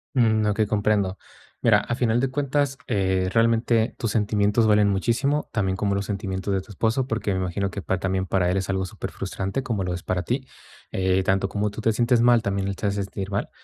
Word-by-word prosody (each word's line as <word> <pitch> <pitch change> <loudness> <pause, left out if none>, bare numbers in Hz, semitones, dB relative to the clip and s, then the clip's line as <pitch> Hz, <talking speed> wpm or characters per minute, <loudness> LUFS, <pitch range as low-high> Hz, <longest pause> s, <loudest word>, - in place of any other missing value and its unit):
Mm, 110 -3 +3
okey, 105 +1 +2
comprendo. 100 -2 +1 0.4
Mira, - - +5
a - - -4
final 120 -1 +1
de 135 - +1
cuentas, 140 0 0
eh, 95 -4 +1
realmente, 115 0 +2
tus 115 - -1
sentimientos 105 +1 +2
valen 105 -1 +4
muchísimo, 125 +9 0
también 95 -5 0
como 100 +1 0
los 100 0 -1
sentimientos 100 -1 -3
de 95 - 0
tu 105 - -14
esposo, 115 +6 0
porque 115 -4 -2
me 95 - -1
imagino 95 +2 -1
que 100 - -6
pa 95 - -1
también 95 0 -1
para 90 -1 +1
él 90 - +1
es 95 0 -2
algo 95 -1 -1
superfrustrante, 95 +4 -4
como 115 -7 -2
lo 90 -1 -2
es 90 - -5
para 90 0 -2
ti. 130 +4 -2 0.4
Eh, 95 0 +1
tanto 95 +1 +1
como 105 +2 -1
tú 105 +2 -7
te 115 - +2
sientes 120 +2 +2
mal, 120 -1 +5
también 100 -2 -1
él 100 - -3
se - - -3
ha - - +3
de 100 - -2
sentir 100 -1 -4
mal. 100 0 -2
105 Hz, 225 wpm, -24 LUFS, 95-115 Hz, 0.4 s, Mira